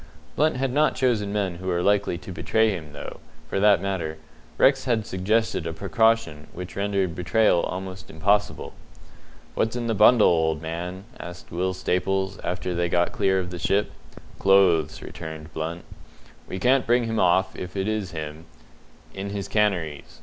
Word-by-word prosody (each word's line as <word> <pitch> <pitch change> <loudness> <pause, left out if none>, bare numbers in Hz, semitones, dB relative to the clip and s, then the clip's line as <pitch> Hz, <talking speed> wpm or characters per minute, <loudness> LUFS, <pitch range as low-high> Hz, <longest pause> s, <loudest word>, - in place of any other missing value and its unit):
Blunt 155 -2 +2
had 130 -1 -1
not 150 +2 +3
chosen 115 -6 +1
men 100 -4 -1
who 95 +2 -8
were 90 -1 0
likely 100 -3 +2
to 90 +2 -10
betray 110 +5 +1
him, 80 -6 -6
though, 75 - -8 0.3
for - - -1
that 105 0 +5
matter, 85 -5 -2 0.4
Rex 135 -1 +4
had 115 -4 +1
suggested 95 -2 0
a 80 - -3
precaution 100 -4 +1
which 90 0 -8
rendered 100 -3 0
betrayal 90 +2 +2
almost 95 0 -5
impossible. 100 +6 0 0.8
"What's 110 +1 0
in 120 -1 -2
the 115 - 0
bundle, 115 +2 +6
old 80 -2 +2
man?" 85 +4 -5 0.2
asked 85 0 -9
Will 95 +2 -1
Staples, 95 +1 -1
after 90 0 -2
they 85 0 0
had 85 - -3
got 85 0 +2
clear 95 0 +1
of 90 -1 -4
the 90 - -6
ship. 100 +5 +1 0.5
"Clothes," 85 -5 +3
returned 80 -1 -8
Blunt. 80 +2 -4 0.6
"We 95 - -5
can't 130 +5 +2
bring 120 +1 +3
him 115 -1 -1
off, 95 +1 +3
if 90 +1 -7
it 95 +1 -1
is 110 -3 -1
him, 80 0 -7 0.7
in 100 +1 -5
his 100 -1 -4
canaries. 85 -9 -1
95 Hz, 170 wpm, -25 LUFS, 85-105 Hz, 0.8 s, bundle